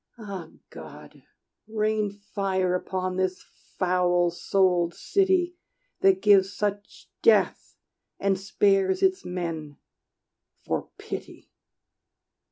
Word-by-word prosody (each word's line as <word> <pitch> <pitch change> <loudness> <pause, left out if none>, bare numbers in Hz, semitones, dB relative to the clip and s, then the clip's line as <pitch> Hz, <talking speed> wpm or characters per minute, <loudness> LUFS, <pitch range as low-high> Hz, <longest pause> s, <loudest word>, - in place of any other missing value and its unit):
Ah 195 -7 -7 0.2
God! - - -12 0.5
rain 215 -1 0
fire 195 -2 -2
upon 185 0 -2
this 185 -1 -1 0.3
foul 180 -1 +2
souled 175 -1 +1
city 370 -3 +1 0.4
That 190 -1 +3
gives 195 -2 +5
such 205 -1 -4
death, 460 - +3 0.4
and 195 -1 +1
spares 195 - +2
its 375 0 +2
men, 165 -5 -5 0.9
for - - -2
pity! - - -8
190 Hz, 90 wpm, -26 LUFS, 180-205 Hz, 0.9 s, gives